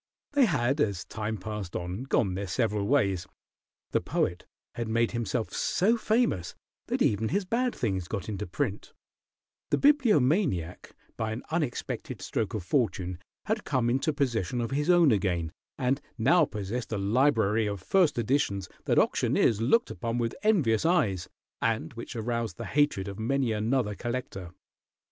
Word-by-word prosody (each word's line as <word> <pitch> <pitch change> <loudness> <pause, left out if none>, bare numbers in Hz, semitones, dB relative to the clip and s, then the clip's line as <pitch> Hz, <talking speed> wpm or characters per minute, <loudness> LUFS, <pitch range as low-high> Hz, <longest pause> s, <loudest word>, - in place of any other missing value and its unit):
They 285 -3 +5
had, 140 - +1
as 100 -8 0
time 110 0 -4
passed 105 -2 -6
on, 90 +8 -4
gone 105 -7 +1
their 100 +2 -3
several 105 0 0
ways. 100 -10 +1 0.6
The - - +2
Poet - - -1 0.3
had 120 -1 -3
made 115 +1 +1
himself 115 -2 -2
so 215 +6 +2
famous 220 - 0 0.3
that - - +1
even 110 +2 +1
his 195 +2 0
bad 245 +5 0
things 95 -6 -2
got 100 -1 -4
into 105 -2 -4
print; 105 +2 -3 0.8
the - - +2
Bibliomaniac, 165 - +2 0.2
by 110 -1 -2
an 110 +3 -5
unexpected 155 -7 -3
stroke 110 -1 -2
of 105 - -3
fortune, 90 - 0 0.3
had 215 0 -1
come 125 -4 +1
into 135 +5 +1
possession 125 - -1
of 115 -1 -2
his 145 +4 0
own 175 -5 +6
again, 90 -6 0 0.3
and 130 +1 0 0.2
now 135 +10 +4
possessed 105 +4 -5
a 110 - -1
library 110 0 +2
of 100 -1 -3
first 170 - +2
editions 110 -6 0 0.2
that - - +2
auctioneers 110 -1 +2
looked 230 - +3
upon 115 -2 -3
with 115 -1 -1
envious 155 - +3
eyes, 110 - +1 0.3
and 115 -1 0
which 115 +2 -8
aroused 115 -4 -2
the - - -5
hatred 145 -9 +1
of 100 +1 -6
many 130 +2 +1
another 110 +1 0
collector. 110 -6 -5
115 Hz, 155 wpm, -28 LUFS, 100-140 Hz, 0.8 s, own